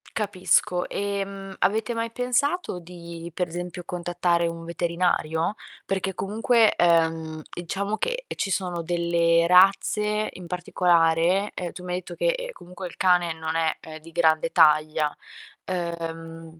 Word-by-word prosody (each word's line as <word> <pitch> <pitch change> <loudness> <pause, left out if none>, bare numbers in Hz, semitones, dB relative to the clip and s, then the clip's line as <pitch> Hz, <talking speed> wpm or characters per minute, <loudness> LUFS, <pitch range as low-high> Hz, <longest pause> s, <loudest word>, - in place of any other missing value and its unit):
Capisco. 185 -3 +1
Ehm, 195 -1 -4
avete 220 +4 0
mai 230 0 -2
pensato 250 - 0
di, 170 -1 -9
per 180 +1 -1
esempio, 175 +1 -6
contattare 175 0 0
un 165 0 -4
veterinario? 170 0 0 0.3
Perché 195 0 -1
comunque, 220 +4 +2
ehm, 160 -2 +2 0.2
diciamo 200 +5 -2
che, - - -1 0.2
ehm, - - -7
ci 195 - -1
sono 180 -3 -2
delle 170 0 +2
razze 210 +3 +4
in 180 - -10
particolare 175 +1 +2
ehm, 175 -2 -4
tu 180 - -10
mi 180 0 -4
hai - - 0
etto 180 - -10
che, - - -1
ehm, - - -1
comunque 180 - -10
il 175 - -8
cane 180 -2 +3
non 160 0 -4
è, 165 -1 +1
ehm, 155 -1 -9
di 165 +1 -13
grande 160 0 +2
taglia, 155 -1 +4 0.5
uhm 165 -2 -5
175 Hz, 145 wpm, -25 LUFS, 165-195 Hz, 0.5 s, razze